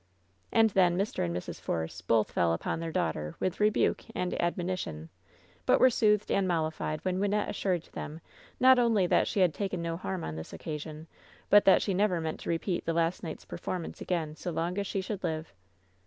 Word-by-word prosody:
And 225 -1 +4
then 180 -2 +3
Mr. 200 +3 -1
and 85 - -1
Mrs. 90 - -6
Force 80 +1 -3
both 110 +4 +2
fell 85 -1 +2
upon 85 - -2
their 165 0 -4
daughter 75 - -2
with 185 -1 -1
rebuke 210 0 +2
and 180 - -1
admonition, 170 - -2 0.6
but - - +5
were 255 - +6
soothed 210 -2 +2
and 195 -1 +2
mollified 155 -2 -1
when 185 0 0
Wynnette 205 +1 +1
assured 185 -5 -1
them 155 +2 -6 0.4
not 260 0 +7
only 225 -6 +3
that - - +3
she 200 - 0
had 175 -4 +4
taken 190 +2 -3
no 165 0 -2
harm 185 0 -4
on 80 - -5
this 80 - -8
occasion, 155 0 -6 0.5
but 205 0 +7
that 195 - +6
she 195 - 0
never 185 -2 +2
meant 160 -1 -3
to - - -6
repeat 170 +2 -1
the 165 - +1
last 165 +1 +1
night's 160 -3 -7
performance 180 -3 -5
again 165 -4 -2
fio 175 +3 -5
long 170 +2 -1
as 200 - -3
die 195 - -1
should 195 0 -5
live. 160 -2 -3
175 Hz, 200 wpm, -30 LUFS, 155-195 Hz, 0.6 s, not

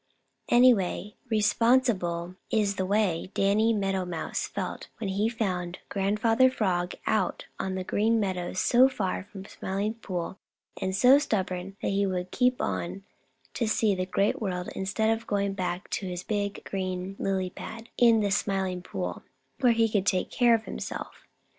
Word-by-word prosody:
Anyway, 215 -5 +4 0.2
re 220 -2 +2
spon 230 +4 +4
sible 180 -7 -2
is 205 -2 +1
the 185 - -1
way 195 -4 +1
Danny 210 +3 +3
Meadow 195 -3 0
Mouse 175 -3 -3
felt - - -5
when 220 -4 -3
he 205 +3 +1
found 185 -6 -2
Grandfather 215 +6 +3
Frog 180 -7 -1
out - - 0
on 190 0 -2
the 185 - -2
Green 225 +4 +2
Meadows 185 -2 -2
so 255 +2 +5
far 190 -8 -2
from 195 -2 -10
the - - -14
Smiling 200 +3 -2
Pool 190 -4 -5 0.4
and 190 0 -1
so 255 +7 +7
stubborn 190 -6 -2
that - - +1
he 200 0 +1
would 180 -1 -3
keep 250 0 +2
on 185 +3 -3 0.5
to 230 - -1
see 215 -1 +2
the 185 -1 -2
Great 195 +4 +1
World 180 -3 -2
instead 195 +4 0
of 225 0 -11
going 200 -1 0
back 180 -1 -3
to 195 - -2
his 180 0 -4
big 205 -1 -2
green 185 0 -3
lily 190 -2 -1
pad 225 +4 -9
in 230 -2 +5
the 200 -1 0
Smiling 190 -2 0
Pool, - - -4 0.4
where 245 -3 +5
he 225 0 +3
could 205 -3 0
take 185 - +1
care 240 -2 +5
of 225 -1 -4
himself. - - -7
200 Hz, 170 wpm, -28 LUFS, 185-220 Hz, 0.5 s, so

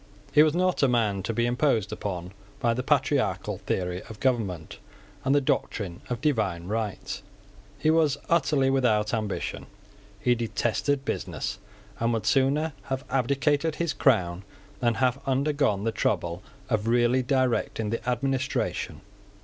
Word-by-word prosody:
He 150 - +6
was 155 0 +4
not 185 0 +2
a 140 - +5
man 110 -6 +1
to 110 - -2
be 120 +1 +1
imposed 120 -4 +1
upon 90 -3 -4 0.3
by 115 -1 +2
the 125 - -1
patriarchal 105 -9 +1
theory 90 -2 -2
of 110 -2 -9
government 100 -11 -1 0.4
and 135 - +3
the 145 - +4
doctrine 95 -8 -2
of 120 -2 -3
divine 105 - 0
right. 105 0 -3 0.6
He 155 - +2
was 155 -3 +3
utterly 145 -5 +3
without 110 -5 +2
ambition. 110 -3 -3 0.5
He 125 - +3
detested 120 +4 -1
business, 100 - -3 0.4
and 115 +1 +1
would 115 - -2
sooner 145 +4 +2
have 130 0 -3
abdicated 140 +4 +1
his 170 -1 -1
crown 90 -9 +2 0.4
than 120 -2 +2
have 130 +1 +1
undergone 135 -6 +1
the 115 - +1
trouble 85 -5 -1 0.3
of 110 -3 0
really 120 +2 +3
directing 125 -4 0
the 115 +2 -2
administration. 130 +2 -1
120 Hz, 140 wpm, -27 LUFS, 105-140 Hz, 0.6 s, He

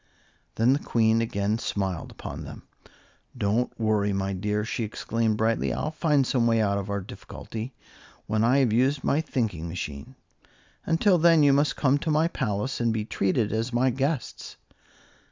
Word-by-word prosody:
Then 115 +4 +4
the 140 - +1
Queen 115 -3 +2
again 105 -1 -1
smiled 95 -6 -3
upon - - -8
them. - - -10 0.7
"Don't 115 +3 0
worry, 105 -2 +1
my 95 0 -1
dear," 105 +3 -1
she 115 - -3
exclaimed, 110 0 -1
brightly, 110 +1 +1
"I'll 155 - -2
find 150 -4 +2
some 120 -2 +1
way 115 -1 +3
out 100 -2 +1
of 100 0 -6
our 100 0 -2
difficulty 115 +5 -8 0.5
when 110 +1 0
I 125 +4 +4
have 130 -6 +3
used 135 +4 +2
my 150 - +2
thinking 110 - -2
machine. 85 - -6 0.7
Until 175 +3 +3
then 165 -2 +5
you 140 -1 +5
must 145 +1 +2
come 140 0 +2
to 160 - -3
my 155 +2 +3
palace 120 -5 -2
and 115 -1 +2
be 110 -1 -2
treated 105 +1 0
as 115 +3 -1
my 125 +2 +2
guests." 135 +2 -3
115 Hz, 170 wpm, -26 LUFS, 105-135 Hz, 0.7 s, then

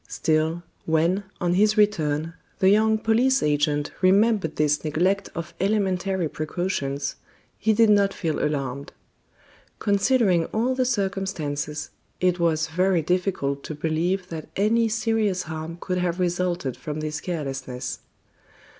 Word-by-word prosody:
Still, 160 +2 0 0.2
when, 170 +5 +2
on 175 -1 +1
his 210 +3 +3
return, 165 -6 +1 0.2
the 190 - +4
young 220 +1 +4
police 245 +5 +2
agent 150 0 +1
remembered 195 -2 +3
this 150 -1 +1
neglect 180 +6 0
of 170 0 -5
elementary 190 -3 0
precautions, 150 -3 -3 0.4
he 220 - +2
did 220 0 +5
not 200 -1 +4
feel 165 -5 -2
alarmed. 140 -2 -3 0.8
Considering 200 -4 +2
all 235 +8 0
the 255 0 +1
circumstances, 190 - -2 0.3
it 180 -1 +2
was 160 -2 +2
very 180 +1 +1
difficult 175 -6 -1
to 155 - -5
believe 170 +5 -1
that 160 -2 -7
any 225 +3 +2
serious 220 -4 0
harm 160 +1 -6
could 180 0 -2
have 180 0 -1
resulted 175 -6 -1
from 150 0 -5
this 155 0 -3
carelessness. 135 -7 -4
180 Hz, 130 wpm, -24 LUFS, 155-200 Hz, 0.8 s, did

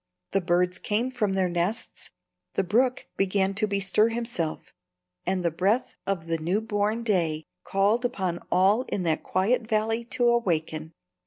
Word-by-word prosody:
The 195 - +2
birds 180 +1 +1
came 230 +5 0
from 210 -6 0
their 190 -1 +2
nests, 175 +6 -2 0.5
the 195 - +2
brook 245 +7 +1
began 195 0 +1
to 215 +2 +1
bestir 200 +2 +2
himself, 230 -9 -3 0.5
and 185 -1 0
the 170 - +2
breath 195 +9 0
of 190 -5 -1
the 165 0 -1
new 175 +6 0
born 215 +1 -1
day 165 -8 0 0.2
called 205 +5 +2
upon 185 -7 -1
all 195 +6 +4
in 190 - -1
that 160 -2 +1
quiet 195 +8 +1
valley 225 +1 0
to 240 +1 0
awaken. 160 -8 0
195 Hz, 155 wpm, -26 LUFS, 175-225 Hz, 0.5 s, all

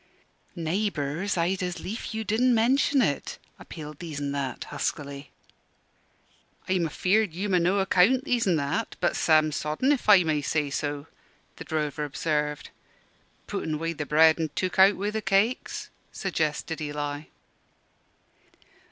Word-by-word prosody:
"Naybours, 170 0 -1
I'd 180 +3 0
as 180 -1 -3
lief 210 +7 -5
you 220 0 -3
didn't 235 +4 +2
mention 265 +4 +3
it," 140 -8 -2 0.2
appealed 150 -2 -9
These 160 -5 -6
an' 140 -1 -2
That, 140 -3 -3
huskily. 140 -1 -4 1.4
"I'm 185 -3 +1
afeard 185 +4 +1
you'm 195 +2 -2
o' 180 - +5
no 180 +4 +2
account, 195 +6 +3
These 240 -6 +1
an' 180 - +3
That: 155 +9 -2
but - - +1
sam 155 -1 +3
sodden, 155 - 0
if 270 -6 0
I 195 -3 +8
may 155 -2 0
say 145 0 -1
so," 145 0 -3 0.5
the - - -7
drover 150 -1 -2
observed. 150 0 -2 0.7
"Put - - -4
in 155 -1 -2
wi' 165 +2 -2
the 150 -2 -5
bread, 160 +1 +5
an' 160 -1 -1
took 185 0 -2
out 195 +1 +7
wi' 205 +2 -2
the 220 0 -2
cakes," 195 +5 0 0.2
suggested 160 -3 -2
Eli. 145 0 -4
165 Hz, 145 wpm, -26 LUFS, 150-200 Hz, 1.4 s, I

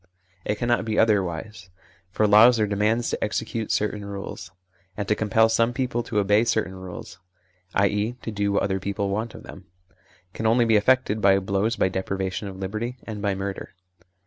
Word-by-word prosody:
It 105 - 0
cannot 120 -1 +1
be 110 -1 -2
otherwise. 95 -3 0 0.4
For 105 +4 +1
laws 110 +3 +6
are 105 - +3
demands 105 +3 0
to - - -2
execute 110 +1 -3
certain 105 0 -1
rules; 100 -2 -7 0.5
and 100 -2 -3
to - - +3
compel 110 +1 +3
some 115 +1 +1
people 125 -2 -1
to 115 - -4
obey 105 +2 +3
certain 110 -5 0
rules 90 -1 -9 0.6
(i.e. 105 +3 +1
to 115 - -4
do 100 -1 -1
what 100 - +1
other 95 -1 0
people 100 +1 -2
want 110 +3 -3
of - - -11
them) - - -12 0.7
can 110 - -2
only 120 +2 +4
be 115 -1 +3
effected 110 0 +2
by 95 -1 +5
blows, 100 +4 0
by - - +2
deprivation 95 +1 -3
of 95 - -7
liberty, 110 +6 -4
and 105 -2 -7
by 100 -1 0
murder. 95 0 -6
105 Hz, 180 wpm, -24 LUFS, 95-110 Hz, 0.7 s, laws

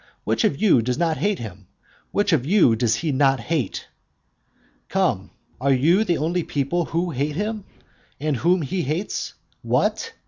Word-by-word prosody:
Which - - 0
of 155 -10 +1
you 190 - +4
does 125 +2 -1
not 165 -1 +1
hate 205 -1 0
him? 100 -4 -9 0.4
which 205 -2 +1
of 140 -6 +2
you 165 - +4
does 115 +3 0
not 135 -3 +2
he 115 - -10
hate? 155 -7 -2 1.0
Come, - - 0 0.3
are 140 +1 +2
you 160 +11 +4
the 175 -6 0
only 170 +5 0
people 155 +3 -1
who 170 +1 -1
hate 145 +2 -2
him; 210 +2 -3 0.5
and 150 -2 -1
whom 175 +4 +2
he 180 +7 -2
hates? 165 +7 -3 0.3
What? 460 0 0
155 Hz, 165 wpm, -23 LUFS, 135-180 Hz, 1.0 s, you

